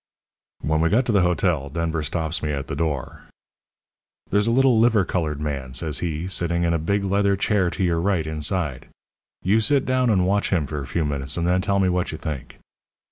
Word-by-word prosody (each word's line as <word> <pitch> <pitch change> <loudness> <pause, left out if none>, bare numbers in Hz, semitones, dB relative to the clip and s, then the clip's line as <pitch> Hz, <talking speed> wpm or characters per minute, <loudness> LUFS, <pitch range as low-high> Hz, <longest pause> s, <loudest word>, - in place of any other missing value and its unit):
"When 80 +1 0
we 85 - +3
got 120 +7 +2
to 120 - 0
the 100 -3 +4
hotel, 90 -5 +1
Denver 80 +1 -2
stops 80 +2 -2
me 75 - -2
at 70 -2 -3
the - - -5
door. 75 -4 -3 1.1
"'There's 105 +2 +2
a - - +2
little 130 -2 +4
liver 110 -4 +4
coloured 80 -5 -2
man,' 70 -4 -4
says 75 +3 -1
he, 85 0 -3
'sitting 85 -2 0
in 85 0 +1
a 85 - +1
big 100 +6 0
leather 100 0 +2
chair 100 -2 +1
to 95 - -3
your 85 -2 +1
right, 90 -4 +1
inside. 80 -1 -2 0.6
You 100 +5 +3
sit 135 +5 +2
down 130 -1 +1
and 95 -4 +3
watch 100 +2 +1
him 85 -6 +1
for 75 +1 -4
a 70 - -7
few 80 +3 -1
minutes, 70 0 -2
and 85 - 0
then 90 +1 +2
tell 100 +1 0
me 95 -1 +3
what 90 -1 0
you 80 - -5
think.' 75 -6 -6
85 Hz, 215 wpm, -23 LUFS, 75-100 Hz, 1.1 s, the